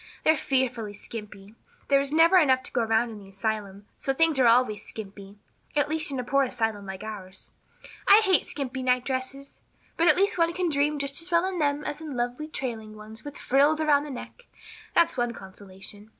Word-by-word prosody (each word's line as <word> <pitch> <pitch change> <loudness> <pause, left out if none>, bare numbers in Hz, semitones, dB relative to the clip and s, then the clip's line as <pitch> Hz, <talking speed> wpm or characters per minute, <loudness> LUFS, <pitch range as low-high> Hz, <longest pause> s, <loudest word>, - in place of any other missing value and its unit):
They're 315 - +5
fearfully 250 -7 -1
skimpy. 210 -1 -9 0.3
There 275 -1 +4
is 275 0 -1
never 330 +4 +6
enough 260 -6 +4
to - - -7
go 245 - 0
around 225 +1 +1
in 210 -2 -9
an 195 - -14
asylum, 200 0 -4
so 270 - -2
things 325 -2 +2
are 250 - +5
always 230 -3 +3
skimpy 200 -1 -10 0.4
at 290 0 +2
least 315 -1 +1
in 270 - -3
a - - -2
poor 275 +3 +2
asylum 225 -6 -2
like 190 +1 -7
ours. 195 -3 -9 0.6
I 405 +2 +8
hate 380 -3 +3
skimpy 260 -2 -4
night 250 -1 +1
dresses. 275 +1 -5 0.4
But 335 +1 +5 0.2
one 335 0 +2
can 360 -1 -1
dream 295 0 +1
just 280 +1 -1
as 335 - -6
well 340 +1 +3
in 375 -2 -3
them 290 -1 0
as 295 - -5
in 300 -5 -6
lovely 245 +5 -2
trailing 225 -7 -5
ones, 215 +1 -12
with 290 -1 -8
frills 285 +4 +3
around 295 -2 +3
the - - -8
neck, 285 - -9 0.5
that's 335 -4 +3
one 240 -1 0
consolation." 195 +1 -11
260 Hz, 195 wpm, -26 LUFS, 215-295 Hz, 0.6 s, I